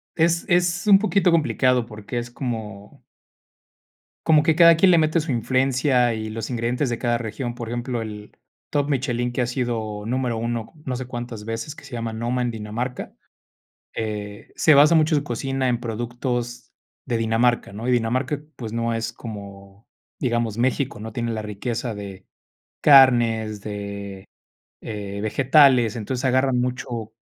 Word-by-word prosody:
es 170 +1 +2
es 175 +2 +2
un 195 -1 +8
poquito 200 -4 +2
complicado 130 -7 +2
porque 110 +2 -7
es 120 0 -7
como 110 -6 -6 1.2
como 155 -2 +5
que 155 0 +2
cada 170 -1 +8
quien 185 +3 +5
le 170 - +6
mete 155 +1 +2
su 150 - -4
influencia 130 0 +2
y 110 0 -5
los 110 +1 -5
ingredientes 120 +3 -1
de 120 - -2
cada 120 -2 +1
región. 120 +2 -4
Por 120 -2 -6
ejemplo, 120 0 -3
el 105 -1 -9 0.3
top 145 -1 0
Michelin 125 -3 0
que 130 - -2
ha 125 - +1
sido 115 -4 -3
número 125 0 -1
1, 115 0 -3
no 130 -2 -2
sé 130 - -5
cuántas 120 -3 -6
veces, 115 +7 -5
que - - -13
se 140 - -13
llama 115 -2 -3
Noma 120 +3 -2
en 120 - 0
Dinamarca. 115 +3 -5 0.8
Eh, 105 -2 -5
se 155 - +5
basa 150 +4 +7
mucho 155 0 +4
su 145 - +1
cocina, 135 +1 -2
en 120 -1 0
productos 120 +1 -4 0.3
de 120 -3 -1
Dinamarca, 115 -1 +1
¿no? 115 +4 -6
Y - - +3
Dinamarca, 125 +4 0 0.2
pues, 115 -3 -6
no 115 0 -1
es 115 0 -3
como, 100 -2 -10 0.3
digamos, 120 -4 -1
México, 130 +2 0
no 110 +1 -7
tiene 115 0 -2
la 110 - -3
riqueza 115 +3 -4
de 100 -2 -9 0.5
carnes, 120 -6 +5
de, 100 -2 -6 0.6
eh, 100 -2 -6
vegetales. 130 0 +4
Entonces, 125 +4 -3
agarran 130 0 +2
mucho 125 -3 -3
120 Hz, 160 wpm, -23 LUFS, 110-130 Hz, 1.2 s, un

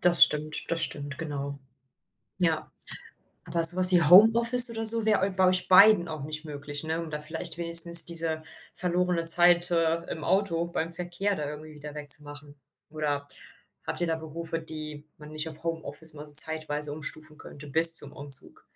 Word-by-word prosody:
Das 175 -1 +4
stimmt, 150 0 -8
das 165 -1 -5
stimmt, 145 -1 -10
genau. 140 -3 -8 0.8
Ja, 165 -4 -3 0.7
aber 165 0 -2
so 175 +2 +8
was 185 0 +6
wie 175 -1 +2
Homeoffice 230 - +5
oder 225 -1 -7
so 225 0 +5
wäre 215 -1 0
eu 195 - -4
bei 185 0 -1
euch 185 0 -1
beiden 190 -1 +4
auch 155 -3 -9
nicht 155 +1 -8
möglich, 145 0 -9
ne? 160 +1 -5
Um 165 - -11
da 150 -1 -8
vielleicht 160 +2 -5
wenigstens 170 0 +7
diese 165 -2 -6 0.3
verlorene 180 -1 -3
Zeit, 175 +1 +5
äh, 165 -1 -2
im 155 - -9
Auto, 180 -3 -2
beim 165 -1 -7
Verkehr 180 +4 -6
da 150 -3 -7
irgendwie 155 +1 -12
wieder 150 0 -13
weg 150 -1 -12
zu 145 - +3
machen. 145 0 -15 0.4
Oder 145 -2 -6 0.6
habt - - -5
ihr 175 - -2
da 165 -1 -4
Berufe, 165 +1 -9
die 155 -2 -11
man 150 0 -15
nicht 155 +1 -6
auf 155 -1 -10
Homeoffice 160 -1 -2
mal 150 0 -12
so 150 - -10
zeitweise 150 -1 +1
umstufen 155 +1 -10
könnte 145 +1 -15
bis 165 +3 +6
zum 145 -2 0
Umzug? 140 -2 +1
160 Hz, 185 wpm, -24 LUFS, 150-175 Hz, 0.8 s, so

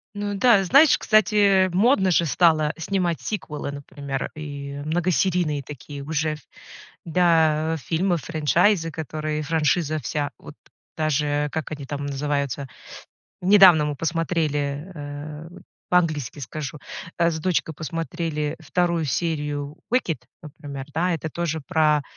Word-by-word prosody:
Ну 205 0 -3
да, 205 -1 +5
знаешь, 280 - +6
кстати, 205 -3 +4
модно 195 -1 +3
же 170 - +3
стало 155 -1 +3
снимать 175 -1 -1
сиквелы, 150 -9 -4
например, 140 -1 -5
и 145 -2 -6
многосерийные 170 -2 0
такие 140 +1 -9
уже, 155 +1 -1
ф 155 - -9 0.7
да, 160 -2 +2
фильмов, 170 +2 0
франчайзы, 165 +3 +2
которые 155 -1 -4
франшиза 155 0 +1
вся 145 +2 -2
вот - - -12 0.4
даже 150 -1 0
как 160 -1 -4
они 145 -2 -6
там 145 +1 -5
называются, 140 -1 -2 0.7
недавно 185 -4 +7
мы 150 0 -2
посмотрели, 155 -1 -1
э, 150 +1 -7 0.4
по-английски 155 -8 +1
скажу, 145 +2 -6 0.4
а, 170 0 +3
с 160 - -3
дочкой 165 -1 0
посмотрели 165 -2 -3
2 170 +1 0
серию 150 -1 -2 0.2
Wicked, 180 -11 +1 0.2
например. 140 -3 -8
Да, 175 +3 +1
это 160 0 -4
тоже 165 -2 -2
про, 150 -1 +3
155 Hz, 120 wpm, -23 LUFS, 145-175 Hz, 0.7 s, недавно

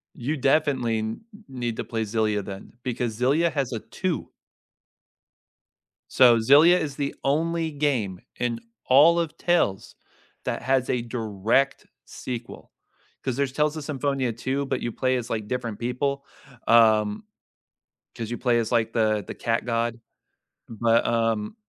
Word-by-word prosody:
You 145 +6 -3
definitely 135 -5 +1
n 110 - -4 0.3
need 120 -3 -4
to - - -2
play 115 -1 -3
Xillia 105 -1 0
then, 95 0 -9
because 120 -3 -3
Xillia 150 +7 +2
has 135 -4 -2
a 115 - -2
2. 185 - -4 1.8
So 120 -3 +6
Xillia 150 +10 +6
is 145 -4 -4
the 140 -1 -2
only 160 +3 0
game 125 -11 -1 0.2
in 120 -1 -1 0.3
all 155 +6 +6
of 165 -2 -3
Tales 135 - 0 0.5
that - - -2
has 130 0 +1
a 125 - +1
direct 115 +2 0 0.2
sequel. 120 -2 -8 0.5
'Cause 130 -3 -1
there's 140 -1 0
Tales 150 +3 0
of 155 - -5
Symphonia 140 -4 -1
2, 130 +5 -2
but 135 -1 -2
you 120 - -2
play 130 -1 +1
as, 120 - -5
like, 110 -2 -3
different 115 -3 -4
people, 140 +3 -2 0.4
um 110 - +4 0.9
'cause 115 -1 -5
you 120 - -3
play 120 -2 +2
as, 115 -1 -1
like, 115 -2 +1
the 110 -3 +1
the - - -6
cat 115 0 -1
god. 115 0 -1 0.7
But, 115 +1 +2
um, 115 - 0
125 Hz, 145 wpm, -25 LUFS, 115-140 Hz, 1.8 s, So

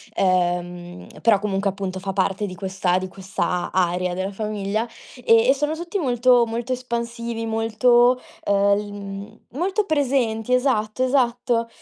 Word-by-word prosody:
ehm, 175 -1 -1
però, 225 -3 +5
comunque, 200 -1 -1
appunto, 190 -1 -4
fa 195 0 -4
parte 195 +1 0
di 185 - -7
questa 190 -2 0
di 185 0 -3
questa 190 -2 -3
area 180 0 +1
della 190 +2 -3
famiglia, 210 +2 -2 0.4
e 230 +1 +5
e - - +7
sono 295 +2 -1
tutti 345 +4 -4
molto 245 -3 +4
molto 235 +3 -4
espansivi, 235 -2 -4
molto, 240 +3 +3 0.3
ehm, 200 0 +3
l 205 0 -5
mhmm, 200 +1 -8
molto 375 - 0
presenti 250 - 0
esatto, 250 -2 +1
esatto, 245 -3 +1
220 Hz, 140 wpm, -22 LUFS, 195-245 Hz, 0.4 s, e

